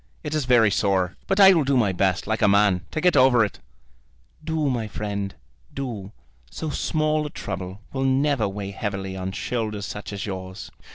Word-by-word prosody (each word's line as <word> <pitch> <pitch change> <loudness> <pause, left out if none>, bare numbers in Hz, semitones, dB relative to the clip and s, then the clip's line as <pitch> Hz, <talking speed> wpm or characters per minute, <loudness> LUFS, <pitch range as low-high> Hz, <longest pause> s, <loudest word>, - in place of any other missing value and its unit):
It 150 -1 -4
is 155 -3 0
very 120 -4 +5
sore; 95 -3 +1
but 195 +1 +1
I 195 -1 +9
will 165 -4 +3
do 135 -1 +2
my 110 -5 +3
best, 95 0 0
like 110 +2 -1
a 105 - +5
man, 100 -2 +4
to - - -3
get 180 +1 +3
over 130 -4 +5
it." 105 - -8 0.8
"Do, 160 -1 -1
my 120 -5 -1
friend, 100 -1 -4 0.4
do. 115 -8 -5 0.4
So 155 -2 -5
small 155 0 0
a - - -7
trouble 95 -4 -6
will 135 0 -1
never 135 -3 +2
weigh 100 0 -5
heavily 100 -2 -4
on 95 0 -4
shoulders 110 -1 -3
such 105 +1 -6
as 100 -1 -4
yours." 95 -2 -7
110 Hz, 185 wpm, -24 LUFS, 100-140 Hz, 0.8 s, I